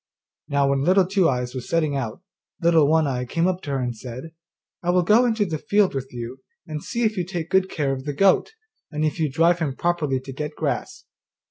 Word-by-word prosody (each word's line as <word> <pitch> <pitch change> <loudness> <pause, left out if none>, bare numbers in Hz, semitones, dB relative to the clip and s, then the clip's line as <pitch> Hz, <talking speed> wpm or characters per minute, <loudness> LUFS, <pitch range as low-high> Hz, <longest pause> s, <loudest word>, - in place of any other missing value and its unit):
Now 140 -1 +2
when 140 0 +1
Little 185 +5 +4
Two 190 -2 +2
eyes 125 -2 -2
was 130 -2 -6
setting 155 -4 +1
out, 135 +4 -4 0.4
Little 165 -3 +4
One 160 +1 +3
eye 125 -3 -1
came 165 +7 -1
up 185 0 -1
to 150 - -8
her 140 - 0
and 125 -2 -2
said, 130 +7 -8 0.5
'I 175 - -2
will 180 0 +3
go 220 +8 +5
into 220 -3 +1
the 160 -5 -3
field 205 +2 +2
with 135 -1 -4
you 120 +2 -7 0.3
and 155 -3 -5
see 235 - -2
if 215 -2 +1
you 180 - +1
take 175 -2 -5
good 190 0 +3
care 140 -3 -1
of 130 0 -6
the 145 - -2
goat, 195 - +3 0.4
and 155 -1 -1
if 155 +3 -2
you 155 -3 0
drive 170 +4 +3
him 145 -5 -2
properly 155 -6 0
to 130 +1 -9
get 150 +2 -5
grass. - - -3
155 Hz, 230 wpm, -23 LUFS, 135-180 Hz, 0.5 s, go